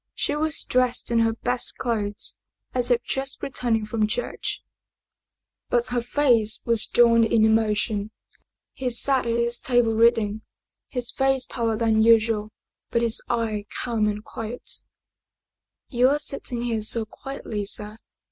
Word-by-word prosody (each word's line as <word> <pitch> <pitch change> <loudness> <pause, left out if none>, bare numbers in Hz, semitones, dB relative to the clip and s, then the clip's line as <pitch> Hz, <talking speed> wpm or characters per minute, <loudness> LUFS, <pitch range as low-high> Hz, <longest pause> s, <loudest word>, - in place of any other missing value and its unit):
She 290 - -1
was 310 +1 +1
dressed 250 -1 +1
in 230 - +3
her 225 0 +2
best 245 +2 -2
56 - - -28
Paid 245 - -4
Heyse - - +4 0.2
clothes, - - -2 0.4
as 250 -1 +1
if 245 -1 +2
just 270 0 -3
returning 235 -5 -1
from 215 0 0
church, 235 +3 -3 1.1
but 240 -1 +1
her 245 0 0
face 235 -4 +2
was 230 -2 +1
drawn 230 -1 +5
in 225 -1 +3
emotion. 215 -1 +1 0.6
He 260 -1 -3
sat 255 +1 +2
at 230 - 0
his 235 0 0
table 240 -3 +2
reading, 220 -2 +2 0.5
his 245 -2 -2
face 270 -1 +1
paler 230 -3 -2
than 220 -1 +2
usual, 220 -1 +3 0.4
but 235 - 0
his 230 -1 +1
eye 220 -3 -1 0.2
calm 225 -3 0
and 210 0 -3
quiet. 225 +2 -7 0.6
" - - -49
You 250 0 +4
are 290 - +2
sitting 255 -4 -3
here 230 -2 -1
so 220 +1 +5
quietly, 220 -4 -6
sir!" 210 +2 -1
230 Hz, 155 wpm, -24 LUFS, 220-245 Hz, 1.1 s, drawn